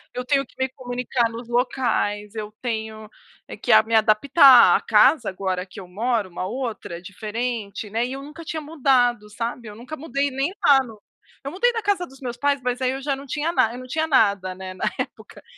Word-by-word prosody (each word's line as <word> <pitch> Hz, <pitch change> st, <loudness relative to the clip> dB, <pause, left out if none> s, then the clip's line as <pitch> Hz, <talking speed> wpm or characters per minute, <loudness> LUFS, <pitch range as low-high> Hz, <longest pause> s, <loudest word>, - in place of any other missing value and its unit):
Eu 250 Hz, -, -4 dB
tenho 275 Hz, 0 st, +1 dB
que -, -, -25 dB
me 260 Hz, 0 st, -1 dB
comunicar 245 Hz, -2 st, -2 dB
nos 230 Hz, +1 st, -8 dB
locais, 235 Hz, -4 st, -1 dB
eu 215 Hz, -1 st, -6 dB
tenho, 220 Hz, -2 st, -4 dB, 0.4 s
eh, -, -, -9 dB
que -, -, -1 dB
a -, -, +7 dB
me 230 Hz, -, -6 dB
adaptar. 240 Hz, +5 st, +6 dB
A -, -, +1 dB
casa 260 Hz, +6 st, +4 dB
agora 185 Hz, -1 st, -3 dB
que 185 Hz, -, -11 dB
eu 185 Hz, -, -10 dB
moro, 220 Hz, +1 st, -1 dB
uma 180 Hz, +1 st, -5 dB
outra, 225 Hz, -7 st, -5 dB
diferente, 215 Hz, +2 st, -5 dB
né, 230 Hz, +3 st, 0 dB
e 255 Hz, -, -5 dB
eu 270 Hz, +1 st, -7 dB
nunca 300 Hz, +3 st, -10 dB
tinha 315 Hz, 0 st, -5 dB
mudado, 255 Hz, -7 st, +1 dB
sabe, 230 Hz, +2 st, -5 dB
eu 210 Hz, -, -9 dB
nunca 250 Hz, +8 st, -8 dB
mudei 280 Hz, -1 st, -2 dB
nem 270 Hz, +6 st, -1 dB
lá 280 Hz, -3 st, +7 dB
no 220 Hz, -4 st, -12 dB, 0.5 s
Eu 275 Hz, -, -4 dB
mudei 480 Hz, +7 st, +2 dB
na 455 Hz, -, -2 dB
casa 400 Hz, -3 st, 0 dB
dos 270 Hz, +1 st, -17 dB
meus 245 Hz, -2 st, -5 dB
pais, 285 Hz, +1 st, +1 dB
mas 250 Hz, 0 st, -2 dB
aí 255 Hz, 0 st, +1 dB
eu 270 Hz, +1 st, -5 dB
já 280 Hz, 0 st, -1 dB
não 275 Hz, -, -10 dB
tinha 300 Hz, +5 st, -1 dB
na 230 Hz, -9 st, +2 dB
eu 245 Hz, -, -7 dB
não 255 Hz, -, -9 dB
tinha 315 Hz, +5 st, -1 dB
nada, 200 Hz, -9 st, +2 dB
né, 185 Hz, 0 st, -8 dB
na 185 Hz, -, -4 dB
época. -, -, -7 dB
245 Hz, 220 wpm, -23 LUFS, 215-275 Hz, 0.5 s, a